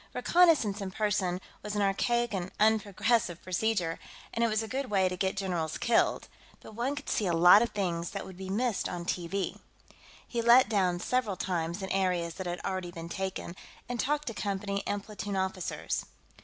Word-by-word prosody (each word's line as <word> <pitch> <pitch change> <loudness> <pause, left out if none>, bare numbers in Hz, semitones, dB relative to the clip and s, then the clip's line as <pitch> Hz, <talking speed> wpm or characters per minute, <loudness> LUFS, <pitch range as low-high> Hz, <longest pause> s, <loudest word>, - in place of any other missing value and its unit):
Reconnaissance 250 - +4
in 195 - -3
person 195 -3 0 0.2
was 210 0 -5
an 205 - +2
archaic 235 +4 +1
and 185 -2 -2
unprogressive 215 -3 +2
procedure, 185 -2 0 0.3
and 230 - 0
it - - +4
was 220 0 0
a - - -5
good 265 +3 -3
way 190 -2 +3
to 180 - -2
get 190 +1 -1
generals 175 -5 -2
killed, 235 - +2 0.3
but - - -12
one 245 +6 -1
could 290 - -8
see 205 - 0
a 175 - +1
lot 175 +5 +8
of 235 - +1
things 175 -4 -2
that 200 - -5
would 190 - -10
be 190 +1 -7
missed 225 +2 0
on 175 -1 -5
TV. 180 +2 -2 0.7
He 235 - -2
let 235 +2 +7
down 185 -5 +1
several 230 0 0
times 175 +1 -2
in 190 - -4
areas 180 -3 0
that 190 +1 -6
had 175 0 -3
already 185 -2 -2
been 170 -1 -8
taken, 190 -1 -4 0.3
and 245 0 -4
talked 295 +4 0
to 230 - -3
company 200 -1 -2
and 205 -1 -1
platoon 205 -2 -5
officers. 190 -1 -2
195 Hz, 190 wpm, -30 LUFS, 180-225 Hz, 0.7 s, lot